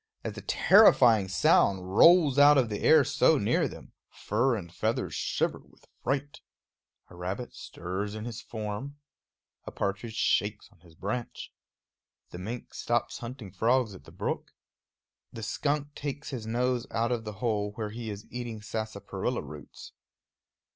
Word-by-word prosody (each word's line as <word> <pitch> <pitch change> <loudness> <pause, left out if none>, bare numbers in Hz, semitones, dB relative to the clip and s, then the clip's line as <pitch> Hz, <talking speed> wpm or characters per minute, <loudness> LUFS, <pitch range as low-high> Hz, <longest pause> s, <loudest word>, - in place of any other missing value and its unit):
As - - -4
the - - -8
terrifying 110 -5 +5
sound 95 0 +2
rolls 160 -2 +6
out 145 0 +8
of 125 -4 +2
the 105 - -3
air - - +6
so - - +3
near - - +1
them, - - -11 0.2
fur 120 +4 0
and 85 -5 -7
feathers - - -1
shiver - - -1
with - - -23 0.2
fright. 140 +2 -2 0.7
A - - -12
rabbit 95 +7 -5
stirs 95 +4 -5
in 110 0 -6
his 120 0 -6
form; 110 +6 -6 0.7
a - - -6
partridge 100 +3 -3
shakes 105 -1 0
on 95 - -25
his 85 -1 -19
branch; 110 +7 -5 0.8
the 90 - -8
mink 115 +6 -6
stops 120 0 -1
hunting 120 -4 -8
frogs 115 +3 +1
at 75 -7 -13
the - - -14
brook; - - -4 0.8
the 115 - -8
skunk 145 +4 -1
takes 145 +1 -5
his 115 -5 -5
nose 125 +1 0
out 115 +1 0
of 120 -2 -1
the 105 -1 -6
hole 105 -2 -1
where 105 -1 -4
he 115 0 -6
is 105 0 -7
eating 120 -3 -5
sarsaparilla 110 +1 -4
roots. 75 -1 -11
110 Hz, 155 wpm, -28 LUFS, 100-125 Hz, 0.8 s, out